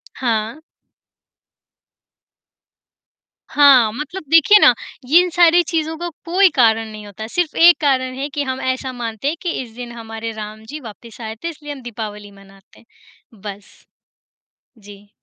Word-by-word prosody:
हाँ। 230 +3 -2 2.9
हाँ, 270 -6 +5
मतलब 300 +9 -6
देखिए 330 +6 +6
ना - - +7 0.3
ये 315 +7 +6
इन 360 - -1
सारी 345 0 +6
चीज़ों 320 -1 -1
का 345 +1 -4 0.2
कोई 370 +3 +4
कारण 225 -3 +3
नहीं 215 -1 -10
होता, 205 +2 -8
सिर्फ़ 340 +6 -2
एक 345 +1 +7
कारण 260 -3 +1
है 280 +2 -4
कि 290 +1 -3
हम 260 -1 -4
ऐसा 260 0 -2
मानते 235 +1 -5
हैं 315 +3 -1
कि 355 - -3
इस 240 -3 -10
दिन 245 0 -8
हमारे 225 -1 -7
राम 215 0 -8
जी 295 +7 -8
वापस 230 -2 -12
आए 220 0 -6
थे 335 - -2
इसलिए 295 -2 -9
हम 275 - -11
दीपावली 210 -4 -8
मनाते 195 0 -20
हैं, - - -23 0.6
बस। 205 -1 -10 0.9
जी। 205 -1 -15
245 Hz, 155 wpm, -19 LUFS, 220-300 Hz, 2.9 s, ना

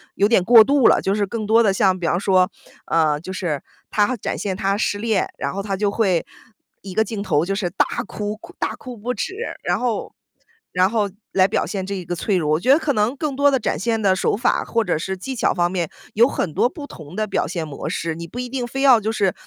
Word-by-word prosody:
有 200 - +3
点 210 -5 +3
过 230 +1 +8
度 275 -1 +4
了， - - +5
就 195 - 0
是 205 -1 0
更 220 +1 -4
多 225 +2 +5
的 210 -4 +3
像 190 -1 +2
比 170 - -2
方 175 - +1
说， 185 -1 +3 0.4
呃， 155 -3 +2
就 185 - -7
是 170 -7 -2 0.3
它 220 +4 +2
展 - - -3
现 190 -2 -3
他 195 +1 0
失 205 -1 0
恋， 215 -2 0
然 - - -3
后 200 - -3
它 195 -1 -3
就 205 0 +1
会 195 -6 +1 0.6
一 190 -2 -9
个 220 - +4
镜 215 -1 -5
头 160 -6 +1
就 195 - -1
是 195 -3 -1
大 180 - +2 0.2
哭 210 0 -4 0.2
大 - - -2
哭 250 -2 -9
不 240 +4 -3
止， 380 - -4 0.3
然 - - 0
后 240 -4 -2 0.6
然 185 +1 +3
后 215 -3 +1 0.2
来 185 -1 +5
表 - - 0
现 195 -3 -4
这 200 +1 -4
一 185 -2 -6
个 175 +1 -3
脆 190 +2 0
弱。 150 -3 0
我 155 - +2
觉 250 +9 +3
得 280 - +7
可 300 -3 0
能 215 +4 +1
更 295 -2 -2
多 285 +1 +4
的 265 - +2
展 210 - -1
现 225 +4 0
的 195 -2 +3
手 195 - 0
法， 245 - +1
或 230 -1 0
者 205 - 0
是 190 +4 -4
技 265 +8 -5
巧 230 - +1
方 175 -1 +1
面 175 -4 -2 0.2
有 230 +3 +5
很 180 - -2
多 245 - +2
不 290 +1 -8
同 155 +1 -11
的 215 +1 0
表 195 - -1
现 165 -1 -4
模 140 - -5
式， 165 0 -2
你 170 +1 -7
不 240 - -8
一 250 - -3
定 255 -1 -3
非 270 +3 -4
要 260 -4 +7
就 215 +2 -1
是 200 -4 +1
200 Hz, 275 characters per minute, -21 LUFS, 185-230 Hz, 0.6 s, 过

